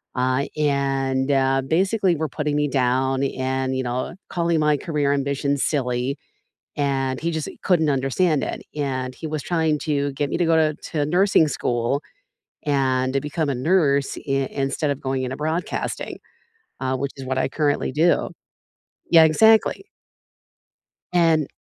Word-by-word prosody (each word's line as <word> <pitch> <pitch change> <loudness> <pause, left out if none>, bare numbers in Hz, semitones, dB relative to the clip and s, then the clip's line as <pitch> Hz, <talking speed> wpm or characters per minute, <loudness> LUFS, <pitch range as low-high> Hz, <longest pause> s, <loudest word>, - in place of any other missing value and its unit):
uh, 130 +2 +1
and, 135 -2 0
uh, 135 -1 +2
basically, 190 +3 +2
were 155 0 -2
putting 150 +1 -2
me 150 0 +1
down 130 0 +1
and, 130 -1 -1
you 130 - 0
know, 125 +4 -3 0.2
calling 170 -2 0
my 150 -1 +3
career 150 -3 -1
ambition 140 0 0
silly, 130 -2 -1 0.6
and 135 -2 0
he 170 +1 -1
just 160 -3 -3
couldn't 160 -5 +3
understand 140 +3 +1
it, - - -4
and 130 -3 -2
he 160 - -6
was 155 -1 -3
trying 160 -3 +1
to 145 -2 -1
get 145 +1 -2
me - - -1
to 175 - +1
go 165 0 +3
to 155 -1 +3 0.2
to 150 -3 0
nursing 175 0 +3
school 120 +1 -1 0.6
and 130 -3 +1
to 135 - +1
become 150 +1 -2
a 140 - -1
nurse 140 -1 +1
i - - -2 0.2
instead 140 +2 -1
of 140 - -3
going 130 -1 -2
into 130 +1 -4
broadcasting, 160 +4 -3 0.6
uh, 130 0 -1
which 140 +1 -3
is 135 - -7
what 130 0 -2
I 130 - 0
currently 145 -2 0
do. 160 +6 +2 0.8
Yeah, 165 -1 +8
exactly. 220 - +4 1.3
And 165 -4 +3
140 Hz, 155 wpm, -22 LUFS, 135-160 Hz, 1.3 s, Yeah